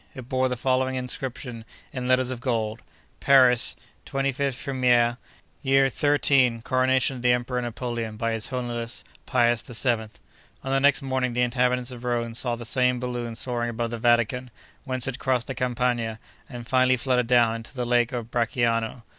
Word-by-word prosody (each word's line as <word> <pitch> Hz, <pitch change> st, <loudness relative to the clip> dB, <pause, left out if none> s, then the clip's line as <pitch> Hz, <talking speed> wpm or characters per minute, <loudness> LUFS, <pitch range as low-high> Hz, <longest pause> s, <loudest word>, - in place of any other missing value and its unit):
It 130 Hz, -2 st, -9 dB
bore 130 Hz, 0 st, +1 dB
the 125 Hz, -, -3 dB
following 130 Hz, +1 st, 0 dB
inscription, 125 Hz, -1 st, -4 dB, 0.3 s
in 125 Hz, -1 st, -4 dB
letters 130 Hz, 0 st, +2 dB
of 125 Hz, -2 st, -6 dB
gold: 115 Hz, -3 st, -2 dB, 0.4 s
'Paris, 130 Hz, -3 st, +5 dB, 0.3 s
25 135 Hz, -1 st, -1 dB
Frimaire; 125 Hz, -3 st, +2 dB, 0.4 s
year 135 Hz, 0 st, +3 dB
XIII; 135 Hz, -4 st, +2 dB
Coronation 130 Hz, +1 st, +2 dB
of -, -, -8 dB
the 125 Hz, 0 st, +3 dB
Emperor 125 Hz, +1 st, 0 dB
Napoleon 120 Hz, -2 st, -4 dB
by 115 Hz, +1 st, -1 dB
his 115 Hz, -1 st, -2 dB
Holiness, 120 Hz, -2 st, -4 dB, 0.2 s
Pius 120 Hz, -3 st, +2 dB
VII.' 120 Hz, -2 st, 0 dB, 0.6 s
On 135 Hz, -, -3 dB
the 135 Hz, -, +3 dB
next 140 Hz, +1 st, +3 dB
morning, 130 Hz, -2 st, -1 dB
the 125 Hz, +1 st, +1 dB
inhabitants 125 Hz, 0 st, 0 dB
of 125 Hz, -1 st, -9 dB
Rome 120 Hz, -1 st, -1 dB
saw 120 Hz, +1 st, -1 dB
the 120 Hz, 0 st, -7 dB
same 125 Hz, +1 st, +2 dB
balloon 120 Hz, -2 st, -4 dB
soaring 120 Hz, 0 st, -2 dB
above 115 Hz, 0 st, -3 dB
the 120 Hz, -, -4 dB
Vatican, 120 Hz, +2 st, +2 dB, 0.4 s
whence 130 Hz, -2 st, -1 dB
it 135 Hz, -1 st, -4 dB
crossed 125 Hz, -3 st, 0 dB
the 135 Hz, -, -4 dB
Campagna, 120 Hz, -3 st, -1 dB, 0.3 s
and 120 Hz, -3 st, -8 dB
finally 130 Hz, 0 st, +3 dB
fluttered 125 Hz, -1 st, +1 dB
down 120 Hz, -2 st, +4 dB
into 115 Hz, +3 st, -11 dB
the 125 Hz, -1 st, -2 dB
lake 120 Hz, -1 st, +2 dB
of 120 Hz, -2 st, -5 dB
Bracciano. 115 Hz, -1 st, 0 dB
125 Hz, 170 wpm, -25 LUFS, 120-130 Hz, 0.6 s, Paris